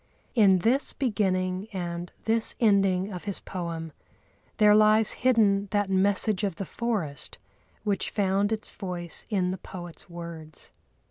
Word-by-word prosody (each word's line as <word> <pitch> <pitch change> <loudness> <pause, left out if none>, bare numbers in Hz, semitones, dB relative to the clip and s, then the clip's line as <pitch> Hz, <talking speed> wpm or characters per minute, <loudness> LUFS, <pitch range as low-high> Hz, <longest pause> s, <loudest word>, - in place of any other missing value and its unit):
In 200 -6 +5
this 260 +5 +3
beginning 190 -6 0
and 175 -2 -4
this 225 0 +1
ending 195 -3 +3
of 180 - -7
his 200 -2 -2
poem 165 -3 -5 0.7
there 210 -2 +6
lies 215 0 +5
hidden 210 -5 +2
that 205 -1 0
message 200 +1 +1
of 195 -4 -1
the 195 - -5
forest 195 - -3 0.5
which 205 -2 -1
found 200 0 +1
its 215 -1 -3
voice 180 -4 -5
in 185 -4 +1
the 185 - -5
poet's 175 -1 -10
words. 170 -3 -9
195 Hz, 135 wpm, -27 LUFS, 180-215 Hz, 0.7 s, there